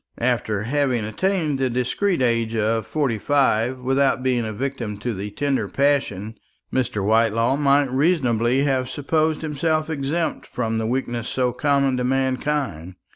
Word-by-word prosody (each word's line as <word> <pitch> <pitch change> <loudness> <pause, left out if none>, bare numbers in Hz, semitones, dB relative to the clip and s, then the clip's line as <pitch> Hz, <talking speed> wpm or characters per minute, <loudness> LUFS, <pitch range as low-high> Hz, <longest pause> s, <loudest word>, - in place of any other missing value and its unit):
After 115 -4 0
having 130 -2 0
attained 155 - -1
the 130 -1 +1
discreet 130 +8 0
age 115 -2 +1
of 110 +1 0
forty 135 -8 -1
five 130 -2 +2
without 135 0 +1
being 125 -2 +1
a - - -3
victim 120 -3 -4
to 120 +3 -3
the 100 +1 -5
tender 135 +6 -1
passion, 115 -7 0 0.3
Mr. 115 -6 -1
Whitelaw 115 +3 +3
might 140 -2 +3
reasonably 130 -4 +2
have 130 -3 0
supposed 155 +2 0
himself 155 +1 -1
exempt 155 +3 -2
from 115 -2 -2
the 110 - -1
weakness 120 -1 -2
so 125 -2 0
common 140 0 +1
to 125 - -1
mankind. 130 - -1
130 Hz, 145 wpm, -22 LUFS, 115-140 Hz, 0.3 s, Whitelaw